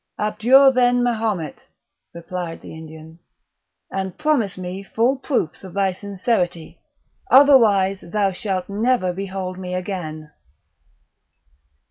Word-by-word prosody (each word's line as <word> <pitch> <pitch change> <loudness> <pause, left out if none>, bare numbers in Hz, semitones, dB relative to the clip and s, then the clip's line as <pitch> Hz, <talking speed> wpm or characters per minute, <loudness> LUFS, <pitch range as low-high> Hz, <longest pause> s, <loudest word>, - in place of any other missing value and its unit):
"Abjure, 240 +6 +5
then, 245 -1 +3
Mahomet," 215 - -2 0.4
replied 170 0 -6
the - - -10
Indian, 160 +1 -12 0.7
"and 190 -1 -4
promise 300 -11 0
me 185 +1 -6
full 235 +6 0
proofs 245 - -2
of 190 -1 -10
thy 195 -2 +1
sincerity, 185 -3 -3 0.5
otherwise 220 -9 +5
thou 200 +2 0
shalt 185 -1 -3
never 210 -2 0
behold 190 -1 -5
me 180 -1 -5
again." 160 -5 -5
195 Hz, 105 wpm, -21 LUFS, 180-230 Hz, 0.7 s, Abjure